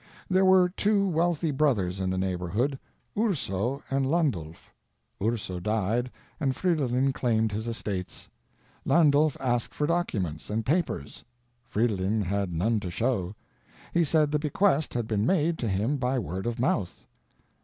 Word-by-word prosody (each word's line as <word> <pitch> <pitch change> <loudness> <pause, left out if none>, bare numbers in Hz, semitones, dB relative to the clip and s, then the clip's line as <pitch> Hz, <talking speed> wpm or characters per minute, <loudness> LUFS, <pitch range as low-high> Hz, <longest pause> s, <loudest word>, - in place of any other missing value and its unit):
There 190 +1 +4
were 185 -1 +6
two 200 +2 +1
wealthy 165 -2 +1
brothers 110 -11 +1
in 95 -1 -1
the 95 - -1
neighborhood, 95 - -1 0.4
Urso 140 - -1
and 135 0 +1
Landulph. 130 - -1 0.5
Urso 105 -4 -1
died 110 +5 0 0.3
and 135 -4 0
Fridolin 135 -7 +1
claimed 110 -4 +1
his 110 +3 -3
estates. 100 -5 -4 0.6
Landulph 150 -2 +4
asked 120 -3 -1
for 150 - 0
documents 100 - -2
and 110 +1 -2
papers. 150 - -1 0.4
Fridolin 105 -1 0
had 100 0 -1
none 105 +7 +1
to 95 - -5
show. 105 -2 -1 0.6
He 170 - +4
said 155 -1 +2
the 150 - +1
bequest 155 0 +1
had 120 -2 0
been 105 -2 0
made 165 - +1
to 120 - -1
him 105 +9 0
by 130 0 0
word 95 -2 -3
of 120 -1 -3
mouth. 105 -7 -1
120 Hz, 145 wpm, -27 LUFS, 100-150 Hz, 0.6 s, were